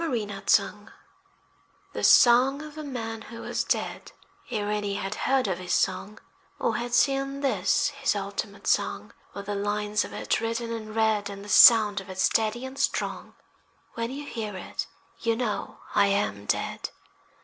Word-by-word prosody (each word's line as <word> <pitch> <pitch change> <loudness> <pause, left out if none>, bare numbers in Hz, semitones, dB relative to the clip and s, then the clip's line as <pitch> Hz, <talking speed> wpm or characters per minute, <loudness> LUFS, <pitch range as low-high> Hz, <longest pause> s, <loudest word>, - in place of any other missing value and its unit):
FELO 245 -10 -1
DE 200 -1 -7
SE 200 -2 +4 1.2
The - - -4
song 260 +4 +6
of 305 -1 -10
a 310 - -6
man 225 -5 -5
who 230 +1 -10
was - - -2
dead - - -2 0.4
Ere 210 -3 -2
any 205 -1 -1
had 195 0 -3
heard 265 +2 +1
of 185 -2 -2
his 180 -1 -1
song, 195 +3 -1 0.4
Or - - 0
had 240 0 -2
seen 275 +1 +1
this 250 +1 +1
his 275 -5 -1
ultimate 200 0 -5
song, - - 0 0.2
With 200 0 -6
the 205 - -3
lines 210 +1 -1
of - - -8
it - - -1
written 230 +1 -2
in 215 -1 -6
red, 220 -2 +1
And 200 0 -8
the - - -10
sound 210 -2 +7
of 195 - -14
it 185 - -8
steady 220 +6 +1
and 265 +1 -8
strong. 275 - -2 0.6
When 230 0 -3
you 285 +3 -6
hear 215 -7 -5
it, 180 - -5 0.3
you 230 -1 0
know 225 -3 -3
I 200 -1 +4
am 195 - -1
dead. - - -2
220 Hz, 170 wpm, -26 LUFS, 200-245 Hz, 1.2 s, sound